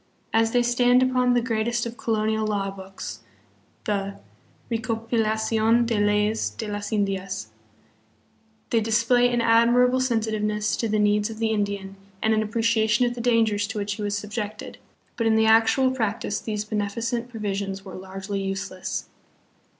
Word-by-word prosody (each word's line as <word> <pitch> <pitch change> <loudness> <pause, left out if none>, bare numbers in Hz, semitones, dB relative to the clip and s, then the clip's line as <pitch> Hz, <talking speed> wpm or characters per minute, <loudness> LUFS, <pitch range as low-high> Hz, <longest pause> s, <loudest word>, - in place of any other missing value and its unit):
As 225 0 +3
they 245 0 +3
stand 245 +1 +4
upon 250 -1 +2
the 240 - +2
greatest 235 0 0
of 235 0 -5
colonial 220 -1 0
law 200 -2 -1
books, 190 -10 -8 0.6
the 200 -1 -2 0.5
Recopilacidn 225 0 +1
de 230 -2 0
Leyes 210 - +1
de 105 - -6
las 205 +1 -4
Indias, 195 - -2 1.2
they 230 - +3
display 230 +3 +3
an 240 -1 +1
a.dmirable 240 +2 +4
sensitiveness 215 -3 0
to 230 - -1
the 215 - +1
needs 210 +1 +2
of 220 - -7
the 225 0 0
Indian 200 -2 -2 0.2
and 220 +2 +2
an 220 - +2
appreciation 225 +1 +2
of 240 - -1
the 240 - -6
dangers 225 -4 +2
to 220 0 -5
which 205 0 -2
he 210 - -7
was 205 0 -1
subjected; 210 0 -6 0.4
but 230 - +1
in 220 - +4
the 220 0 +4
actual 225 +4 +4
practice 220 -4 -2
these 210 -1 -3
benefi 210 +1 -3
cent 235 +1 -2
provisions 200 -3 -4
were 190 - -9
largely 195 +1 -5
useless. 195 -1 -4
220 Hz, 155 wpm, -24 LUFS, 205-230 Hz, 1.2 s, stand